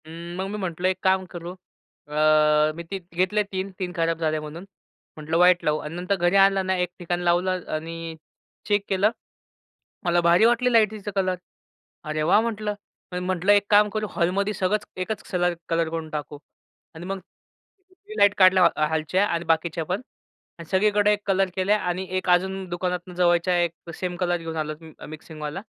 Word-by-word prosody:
हं, 170 +2 -8
मग 190 +1 -2
मी 210 - -4
म्हटलं 185 -2 -2
एक 185 - -2
काम 190 0 +2
करू, 175 0 -6 0.6
अ, 150 - -8 0.6
मी 170 - -6
ती 195 +4 -6
घेतले 185 +4 +1
3-3 190 -2 -5
खराब 165 -1 0
झाले 155 -1 0
म्हणून. 155 +3 -8 0.5
म्हटलं 155 +2 -2
व्हाइट 180 0 +5
लावू 150 0 +2
आणि 150 +2 -7
नंतर 180 +3 -1
घरी 175 0 +1
आणलं 195 -1 +4
ना, 190 0 +1
एक 180 -1 0
ठिकाण 175 0 -2
लावलं 180 +1 +1
आणि 165 +1 -6 0.5
चेक 205 -1 +2
केलं, 195 +2 +3 0.9
मला 175 0 +3
भारी 170 +5 +5
वाटली 240 +2 +3
लाईटचा 215 -2 +2
कलर. 185 -1 +1 0.7
अरे 155 -1 -2
वाह! 175 +6 +5
म्हटलं. 215 -2 -2 0.4
मी 180 - -2
म्हटलं 185 +1 +1
एक 205 0 +4
काम 210 0 +5
करू. 215 -1 -2
हॉलमध्ये 195 +4 0
सगळंच 205 +2 0
एकच 200 +3 -3
कलर 175 -1 +1 0.2
कलर 165 -1 +1
करून 165 -1 -5
टाकू 150 -1 -5 0.6
आणि 165 +2 -8
मग 195 +1 -4 0.6
ती 380 +3 -15
लाईट 205 0 +5
काढल्या 185 -1 +6 0.3
हॉलच्या 160 +5 +1
आणि 170 -2 -2
बाकीच्या 165 +1 0
पण 185 +7 -2 0.6
आणि 170 - -8
सगळीकडे 205 +2 +3
एक 205 - -2
कलर 195 -1 +2
केलं 190 +2 +2
आणि 185 -2 -2
एक 185 - -3
अजून 190 +2 +2
दुकानातून 180 0 -3
जवळच्या 175 0 +3
एक 170 0 -6
सेम 180 -1 -4
कलर 175 -1 0
घेऊन 165 -1 -6
आलो, 155 0 -2
मि 160 -1 -13 0.2
मिक्सिंगवाला 155 +2 -7
180 Hz, 175 wpm, -24 LUFS, 170-195 Hz, 0.9 s, काढल्या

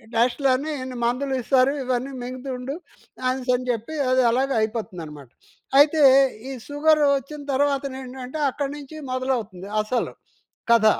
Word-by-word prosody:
టెస్ట్‌లని 255 +5 +2
ఇన్ని 255 -1 -6
మందులు 265 +3 0
ఇస్తారు. 260 +2 +3
ఇవన్నీ 255 +1 -1
మింగుతుండు 255 +1 -5 0.5
అనేసనీ 255 -1 0
చెప్పి 235 +7 -4
అది 255 0 +4
అలాగ 260 +4 +1
అయిపోతుందనమాట. 170 - -5 0.5
అయితే 300 +2 +5 0.5
ఈ - - -4 0.2
సుగరు 300 +1 +3
వచ్చిన 290 +3 -8
తర్వాతనేంటంటే 265 -1 -2
అక్కడి 280 +1 -3
నుంచి 290 +1 -10 0.2
మొదలవుతుంది 235 -8 -2
అసలు 235 +3 -1 0.6
కథ. 230 -2 +5
255 Hz, 115 wpm, -23 LUFS, 240-275 Hz, 0.6 s, అయితే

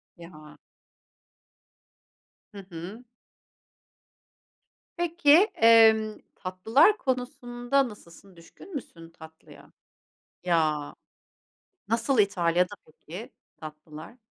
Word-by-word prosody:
Ya. 155 -3 -14 2.0
Hı 200 -1 -10
hı. 180 +8 -9 1.9
Peki, 340 -3 -1 0.3
emm, 220 -1 +5 0.2
tatlılar 220 - +2
konusunda 250 0 -2
nasılsın? 195 -2 -16
Düşkün 305 - -15
müsün 165 -11 -9
tatlıya? 160 -1 -16 0.7
Ya, 155 -4 0 1.0
nasıl 230 +3 0
İtalya'da 180 -2 +1
peki 170 +6 -11 0.2
tatlılar? 155 +7 -12
200 Hz, 65 wpm, -26 LUFS, 165-240 Hz, 2.0 s, emm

